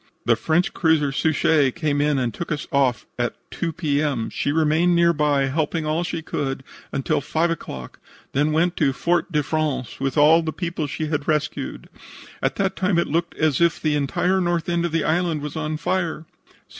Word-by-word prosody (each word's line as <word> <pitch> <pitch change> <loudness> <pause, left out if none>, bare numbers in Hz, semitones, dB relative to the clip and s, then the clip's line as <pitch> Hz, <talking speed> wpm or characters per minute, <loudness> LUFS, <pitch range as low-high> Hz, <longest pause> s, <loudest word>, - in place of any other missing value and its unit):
"The 115 +1 +4
French 170 - +1
cruiser 160 -4 +2
Suchet 150 -2 +2
came 145 -2 0
in 150 -1 +2
and 125 -3 -1
took 170 - -6
us 150 +1 -3
off 135 -6 +1
at - - -1 0.2
2 165 - -2
P. 150 -4 0
M. 135 -7 -1
She 145 - -1
remained 160 +3 +3
nearby, 150 -5 +3
helping 155 +3 -1
all 155 +3 0
she 170 -2 -4
could, 135 -3 -3 0.3
until 135 +1 0
5 160 +4 0
o'clock, 65 - -7 0.3
then 145 +3 +1
went 170 +3 +2
to 140 -3 +2
Fort 170 +4 0
de 150 -2 +1
France 150 -4 -2
with 135 +2 -2
all 155 +3 +6
the 160 -1 -3
people 170 -3 -3
she 155 +2 -3
had 150 -2 -2
rescued. 155 0 -2 0.5
At - - 0
that 195 -1 0
time 185 -1 +1
it 170 - +1
looked 170 +3 -1
as 155 -2 +1
if 170 -1 +3
the 155 -1 0
entire 180 +6 +1
north 175 -2 0
end 170 0 0
of 170 - -2
the 165 -1 +1
island 165 -2 0
was 150 - -5
on 155 0 -2
fire." 170 -2 -2
155 Hz, 195 wpm, -23 LUFS, 145-170 Hz, 0.5 s, all